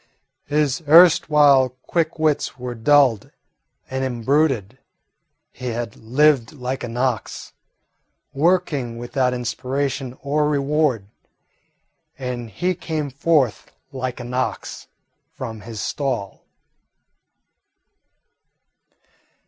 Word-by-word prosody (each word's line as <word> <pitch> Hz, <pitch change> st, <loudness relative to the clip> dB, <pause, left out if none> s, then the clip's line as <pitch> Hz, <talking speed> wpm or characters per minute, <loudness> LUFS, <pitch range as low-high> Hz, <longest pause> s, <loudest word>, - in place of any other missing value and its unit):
His 145 Hz, -1 st, 0 dB
erstwhile 150 Hz, -5 st, +6 dB
quick 165 Hz, -1 st, -1 dB
wits 155 Hz, -3 st, 0 dB
were 125 Hz, -1 st, -5 dB
dulled 125 Hz, -2 st, +3 dB, 0.6 s
and 130 Hz, 0 st, -3 dB
imbruted. 130 Hz, -2 st, 0 dB, 0.7 s
He 125 Hz, -, -8 dB
had 120 Hz, -2 st, -4 dB
lived 130 Hz, +2 st, +2 dB
like 130 Hz, -1 st, -4 dB
an 120 Hz, 0 st, -5 dB
ox, 125 Hz, -3 st, -2 dB, 0.8 s
working 145 Hz, -6 st, +1 dB
without 125 Hz, +2 st, 0 dB
inspiration 130 Hz, +1 st, -3 dB
or 150 Hz, +1 st, +1 dB
reward, 145 Hz, -6 st, +1 dB, 1.1 s
and 125 Hz, -3 st, -5 dB
he 180 Hz, -, -1 dB
came 160 Hz, -5 st, -4 dB
forth 140 Hz, -3 st, +1 dB, 0.2 s
like 130 Hz, -2 st, -4 dB
an 120 Hz, 0 st, -7 dB
ox 130 Hz, +1 st, -3 dB, 0.5 s
from 110 Hz, -4 st, -6 dB
his 110 Hz, 0 st, -8 dB
stall. 110 Hz, -1 st, -3 dB
130 Hz, 90 wpm, -21 LUFS, 120-150 Hz, 1.1 s, erstwhile